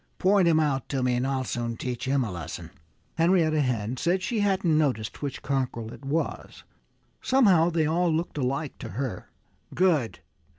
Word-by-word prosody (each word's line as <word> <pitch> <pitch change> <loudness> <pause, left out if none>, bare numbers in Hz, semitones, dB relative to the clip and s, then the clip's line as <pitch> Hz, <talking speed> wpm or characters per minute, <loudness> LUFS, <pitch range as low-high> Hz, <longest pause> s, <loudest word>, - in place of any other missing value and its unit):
Point 190 -1 +4
him 160 -2 +4
out 140 -4 0
to 135 -2 -1
me 125 -1 +2
and 125 +2 0
I'll 135 -1 -1
soon 120 -2 -3
teach 125 +1 -4
him 135 0 +1
a 110 - -4
lesson." 85 -1 -7 0.5
Henrietta 165 -3 +3
Hen 120 -2 -1
said 175 +6 +2
that 185 - -5
she 225 +2 -1
hadn't 190 -5 +2
noticed 130 -8 0
which 140 -1 -5
cockerel 125 -4 -2
it - - -13
was. 150 +4 -3 0.6
Somehow 195 -11 +4
they 165 -2 +1
all 170 +2 +1
looked 160 -1 -2
alike 135 +3 -2
to - - -7
her. 130 -8 -4 0.5
"Good!" 155 - +1
140 Hz, 175 wpm, -26 LUFS, 125-170 Hz, 0.6 s, Point